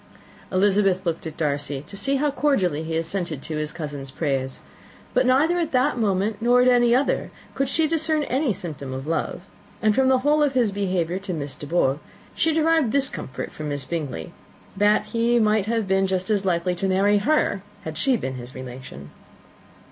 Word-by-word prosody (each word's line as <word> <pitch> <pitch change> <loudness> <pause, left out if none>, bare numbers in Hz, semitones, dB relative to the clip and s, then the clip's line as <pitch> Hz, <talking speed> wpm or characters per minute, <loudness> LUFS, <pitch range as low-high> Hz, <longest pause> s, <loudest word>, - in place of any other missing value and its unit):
Elizabeth 195 0 +2
looked 165 -1 -2
at 155 - -8
Darcy, 145 -2 -2
to 200 - -10
see 275 +8 0
how 290 +1 +1
cordially 195 - +1
he 160 0 -2
assented 165 -3 -3
to 155 - -4
his 150 0 -2
cousin's 145 -4 -6
praise: 135 -2 -2 0.5
but - - +3
neither 310 +7 +3
at 330 -4 -2
that 255 +3 +2
moment 205 0 0
nor 245 +2 +4
at - - +3
any 240 -1 +5
other 270 +3 +1 0.2
could 275 -1 -1
she 320 +3 +2
discern 315 -1 +1
any 270 -1 0
symptom 150 -8 -6
of 130 +1 -5
love; 165 +2 -2 0.4
and 215 0 +3
from 265 +4 +3
the 260 0 +5
whole 300 +1 +4
of 290 -2 +2
his 240 -5 +2
behaviour 185 -3 -1
to 195 -3 -4
Miss 140 -3 -5
De 145 - -9
Bourgh 145 -4 +1 0.3
she 325 - +1
derived 320 -5 +2
this 275 -1 +4
comfort 130 - -6
for 155 - -8
Miss 145 -3 -2
Bingley, 140 - -4 0.4
that 205 +1 +3
he 235 +1 +2
might 215 -2 +2
have 225 -2 0
been 190 0 +2
just 185 +2 -1
as 200 -2 +1
likely 180 0 +1
to 185 +2 -2
marry 200 +2 +3
her, 205 -4 +1 0.2
had 160 -1 -6
she 255 - +2
been 130 -9 -4
his 125 +1 -10
relation. 125 - -9
195 Hz, 195 wpm, -23 LUFS, 155-250 Hz, 0.5 s, any